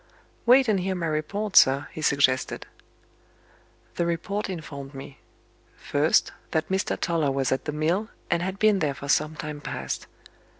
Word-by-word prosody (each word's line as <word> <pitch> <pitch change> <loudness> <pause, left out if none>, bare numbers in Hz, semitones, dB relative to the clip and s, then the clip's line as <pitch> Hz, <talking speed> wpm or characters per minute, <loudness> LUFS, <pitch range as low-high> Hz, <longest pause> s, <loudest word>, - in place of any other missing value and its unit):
"Wait 255 +1 +7
and 210 -3 +2
hear 190 +1 -1
my 175 -2 -2
report, 180 +7 -2
sir," 135 +2 +6
he 155 - -7
suggested. 140 -3 +1 1.3
The 170 - +1
report 200 +5 -2
informed 140 -5 -7
me: 135 0 -10 0.6
First, - - +2 0.2
that 160 0 -1
Mr. 190 0 -1
Toller 165 -4 +1
was 135 -1 0
at 130 - -1
the 150 - -2
mill, 170 +9 0 0.2
and 170 -1 +2
had 190 +2 -3
been 215 -1 +4
there 145 -5 0
for 140 - -8
some 155 +2 +2
time 150 -1 -6
past. - - -5
160 Hz, 160 wpm, -26 LUFS, 140-190 Hz, 1.3 s, Wait